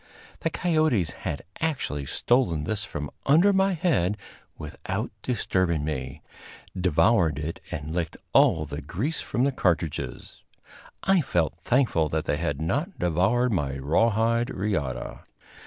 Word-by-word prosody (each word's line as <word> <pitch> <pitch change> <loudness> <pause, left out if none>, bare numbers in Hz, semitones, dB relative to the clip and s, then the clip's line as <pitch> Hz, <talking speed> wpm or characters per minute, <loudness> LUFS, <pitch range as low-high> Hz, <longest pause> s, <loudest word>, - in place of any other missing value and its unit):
The - - 0
coyotes 155 - +1
had 70 - -5 0.2
actually 125 - -2
stolen 105 - +1
this 100 +5 -2
from 75 -6 -5 0.2
under 170 +8 +6
my 195 0 +3
head 120 - +1 0.4
without 75 -1 -4
disturbing 95 - 0
me, 70 -3 -4 0.5
devoured 90 -2 +3
it 80 +2 -4
and 75 +2 -5
licked 85 -2 -2 0.2
all 80 -1 +5
the 75 +1 -6
grease 110 - -2
from 120 - -1
the 140 - +3
cartridges. 85 - -2 0.6
I 190 -2 +4
felt 85 - 0
thankful 110 - +2
that 80 +1 -1
they 75 - 0
had 75 -4 -2
not 145 - -1
devoured 95 +9 +2
my 70 -8 -1
rawhide 115 - +2
riata. 90 - -2
90 Hz, 130 wpm, -26 LUFS, 75-125 Hz, 0.6 s, under